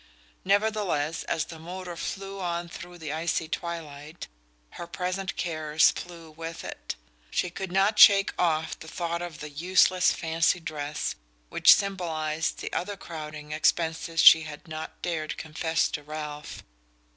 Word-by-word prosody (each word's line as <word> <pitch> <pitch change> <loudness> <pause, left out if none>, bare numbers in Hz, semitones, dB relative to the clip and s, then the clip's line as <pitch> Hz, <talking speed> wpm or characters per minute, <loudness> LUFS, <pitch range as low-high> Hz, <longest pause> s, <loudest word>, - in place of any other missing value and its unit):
Nevertheless, 195 -6 +1
as 160 - -1
the 165 -1 -10
motor 180 +1 -7
flew 195 +4 -5
on 170 -1 -2
through 175 +1 -9
the 155 -3 -5
icy 160 0 -1
twilight, 155 -2 -6 0.4
her 170 - -8
present 185 +2 -3
cares 155 -2 +2
flew 170 -2 -9
with 165 +1 -7
it. - - -6 0.3
She 180 - -1
could 190 0 -5
not 195 +3 +2
shake 200 -2 +8
off 160 -2 +1
the 160 - -10
thought 170 +1 -3
of 175 -3 -7
the 150 - -6
useless 180 +3 +4
fancy 165 +1 +1
dress 150 -3 -3 0.4
which - - +7
symbolized 165 -5 -2
the - - -5
other 200 +2 -2
crowding 150 -4 -8
expenses 160 +1 +1
she 160 - +10
had 155 0 -9
not 155 0 -7
dared 160 -3 -2
confess 160 +1 0
to 150 - -4
Ralph. 150 0 -7
165 Hz, 145 wpm, -27 LUFS, 155-180 Hz, 0.4 s, she